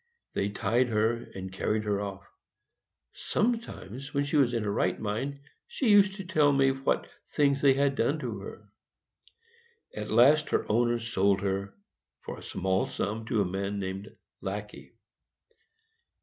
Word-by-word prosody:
They 100 - 0
tied 120 +4 +1
her, 115 +1 0
and 95 0 -6
carried 105 +3 -1
her 105 -1 0
off. 100 -1 -5 0.9
Sometimes, 145 - -3
when 140 - +2
she 140 +2 -2
was 135 -5 +4
in 115 - 0
her 105 - -1
right - - 0
mind, 125 +7 -3 0.3
she 295 - -1
used 200 -1 +6
to 195 - -6
tell 155 -5 +3
me 135 -1 +4
what 135 +1 0 0.2
things 140 -2 +2
they 135 -2 +5
had 140 0 +2
done 135 +4 +1
to 120 -8 -4
her. 105 +2 -10 1.3
At 105 0 -5
last 140 +7 +5
her - - +1
owner 120 +2 +2
sold 100 -4 +1
her, 100 0 -2 0.5
for - - -7
a - - -13
small 95 +1 -1
sum, 110 +3 -3
to 115 -5 +1
a - - -3
man 100 +2 -3
named 95 +1 -4 0.3
Lackey. 105 +2 -6
115 Hz, 155 wpm, -29 LUFS, 100-140 Hz, 1.3 s, used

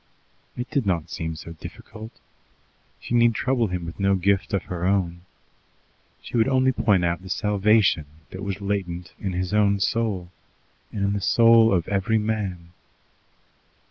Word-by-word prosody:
It 125 +1 -4
did 135 -8 0
not 85 -4 -1
seem 80 -2 -4
so 85 +1 -9
difficult. 110 +6 -10 0.9
She - - -6
need 120 -1 +4
trouble 125 -2 +1
him 90 -2 -4
with 85 +3 -8
no 100 0 +3
gift 95 0 +1
of 100 -3 0
her 90 -1 -5
own. 90 -2 0 1.0
She - - -7
would 115 0 +3
only 130 -1 +3
point 100 -8 +2
out 85 +1 -1
the 95 - -11
salvation 105 -5 +2 0.2
that 95 - -7
was 100 0 -4
latent 90 -3 -3
in 95 -2 -3
his 90 +2 -2
own 100 -1 +3
soul, 100 -4 -1 0.6
and 100 -1 -2
in 100 - +1
the 100 - -2
soul 115 +2 +5
of 90 -4 +1
every 100 +2 +1
man. 105 -6 -3
100 Hz, 160 wpm, -24 LUFS, 90-110 Hz, 1.0 s, soul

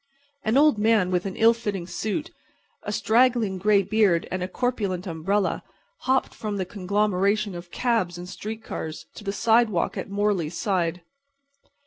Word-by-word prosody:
An 220 +4 +2
old 295 -6 +5
man 210 -4 +3
with 180 +1 0
an 190 - -5
ill 230 +1 +5
fitting 205 -6 -4
suit, 220 - -3 0.5
a 205 - -4
straggling 220 -2 +2
gray 200 +1 +4
beard 195 -4 +2
and 185 - -2
a 180 - -1
corpulent 200 -4 -2
umbrella 190 +4 0 0.5
hopped 260 0 +2
from 210 -2 -4
the 190 - -1
conglomeration 200 +1 0
of 175 0 -8
cabs 220 -6 0
and 175 +1 -7
street 220 +4 -6
cars 160 -6 -6
to - - -11
the 200 - -2
sidewalk 220 -3 +2
at - - -6
Morley's 200 -5 0
side. 180 -4 0
205 Hz, 155 wpm, -25 LUFS, 180-220 Hz, 0.5 s, old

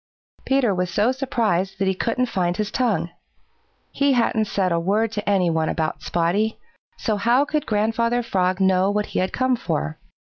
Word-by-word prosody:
Peter 265 -6 +2
was 180 -1 -1
so 210 +7 +2
surprised 225 -9 -1
that 195 0 0
he 190 - +2
couldn't 230 +6 0
find 180 -6 -1
his 210 -1 -2
tongue. 220 -9 0 0.8
He 280 -1 +2
hadn't 230 -3 +1
said 195 -3 -1
a 170 - +2
word 205 +6 +1
to 210 -2 -3
any 185 -4 +2
one 160 -1 0
about 160 -2 -2
Spotty, 180 +6 0 0.4
so 215 -2 -1
how 240 +7 +3
could 300 0 -2
Grandfather 230 +3 +1
Frog 185 -4 0
know 190 0 +3
what 210 0 0
he - - +1
had 185 - 0
come 255 0 +1
for? 75 - -3
205 Hz, 180 wpm, -22 LUFS, 185-235 Hz, 0.8 s, how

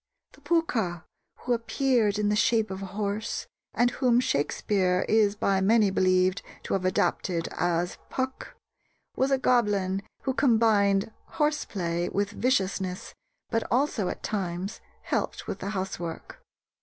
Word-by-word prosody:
The - - -20
Pooka, 225 - 0 0.4
who 245 - 0
appeared 230 -2 +1
in 210 -1 +1
the 210 - +2
shape 220 -1 +2
of 190 0 -5
a 195 - -5
horse, 210 +2 -2 0.3
and 245 0 +3
whom 245 -2 +3
Shakespeare 185 - +1
is 210 -2 +3
by 195 -2 +1
many 210 0 +4
believed 185 0 +2 0.2
to - - -3
have 190 -1 0
adapted 180 -2 0
as 175 0 -1
"Puck," 260 0 -4 0.6
was 265 - +1
a 270 - +3
goblin 205 -7 +1 0.2
who 265 - 0
combined 220 -6 +3 0.3
"horse 300 0 +1
play" 175 -3 -2
with 200 0 -1
viciousness, 190 -6 -1 0.4
but 225 - +2
also 245 -6 +1
at - - -6
times 190 -1 -3 0.2
helped - - -2
with - - -5
the 200 - -4
housework. 185 -4 -5
205 Hz, 140 wpm, -27 LUFS, 185-235 Hz, 0.6 s, many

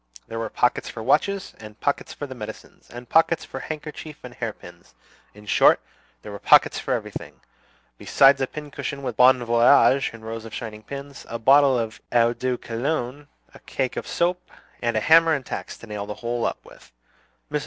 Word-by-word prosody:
There 115 - -5
were 115 -1 -3
pockets 125 - 0
for 110 - -7
watches, 190 - +1
and 110 0 -12
pockets 145 - -1
for 145 - -6
medicines, 125 -6 -10
and 120 0 -10
pockets 165 +2 +2
for 135 - -7
handkerchief 150 0 -7
and 125 -1 -9
hairpins, - - -8 0.4
in 105 0 -14
short, 105 - +5 0.4
there - - -8
were 100 - -7
pockets - - +5
for - - -1
everything; - - -7 0.6
besides 135 0 +4
a 135 - +1
pincushion 145 -1 -6
with 125 -3 -3
"Bon 125 +1 +5
Voyage" 120 +3 +4
in 115 -1 -12
rows 115 0 -6
of 115 -1 -9
shining 110 -2 -7
pins, 140 +4 -9
a 115 - -3
bottle 135 +3 +5
of 115 -1 -4
eau 120 0 +3
de 125 +1 -2
cologne, 130 +4 -3 0.3
a - - -14
cake 130 -2 -3
of - - -5
soap, 180 +1 -1 0.3
and 115 -2 0
a - - +1
hammer 165 +2 +5
and 135 -2 -5
tacks - - -6
to - - -12
nail 105 -2 -6
the 105 - -5
whole 120 0 -2
up - - -6
with. - - -17 0.6
Mrs. - - 0
125 Hz, 185 wpm, -23 LUFS, 115-140 Hz, 0.6 s, short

